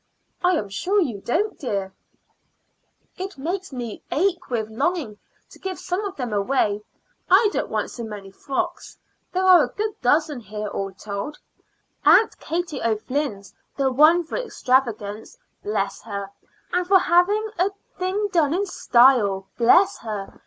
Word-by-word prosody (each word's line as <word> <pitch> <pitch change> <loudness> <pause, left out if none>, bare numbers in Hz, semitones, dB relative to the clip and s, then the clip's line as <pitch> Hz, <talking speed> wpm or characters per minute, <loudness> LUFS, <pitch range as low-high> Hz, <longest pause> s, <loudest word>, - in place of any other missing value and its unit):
"I 360 +1 +4
am 210 - -2
sure 370 - 0
you 240 - -1
don't, 415 - -1
dear." 195 -7 -3 1.2
"It 380 +1 -5
quite - - -31
makes 360 +7 -4
me 240 -4 -6
ache 360 +1 0
with 225 -4 -1
longing 245 -3 -2 0.3
to - - -15
give 380 -1 -4
some 365 +3 -3
of 390 -1 -5
them 245 -5 -4
away. 205 0 +1 0.5
I 405 +3 +6
don't - - -2
want - - -2
so 235 - -7
many 205 -3 -8
frocks: 340 - -4 0.3
there 370 +1 0
are 370 -1 +8
a - - -2
good 430 0 -2
dozen 295 +2 +2
here 210 -1 -6
all 195 -1 -3
told. 200 +8 -6 0.7
Aunt 445 - +5
Katie 330 -4 -3
O'Flynn's 225 -1 -2 0.2
the 270 -2 +2
one 310 +6 +5
for 325 - -5
extravagance, 240 - -1 0.2
bless 200 -1 -2
her! 200 -2 -6 0.4
and 360 0 +1
for 385 0 +7
having 385 +5 +3
a 370 +2 +3 0.3
thing 380 +3 0
done 325 -4 +2
in 400 +3 0
style, 235 - +4
bless 315 +12 +4
her! 210 -4 -6
275 Hz, 150 wpm, -23 LUFS, -, 1.2 s, are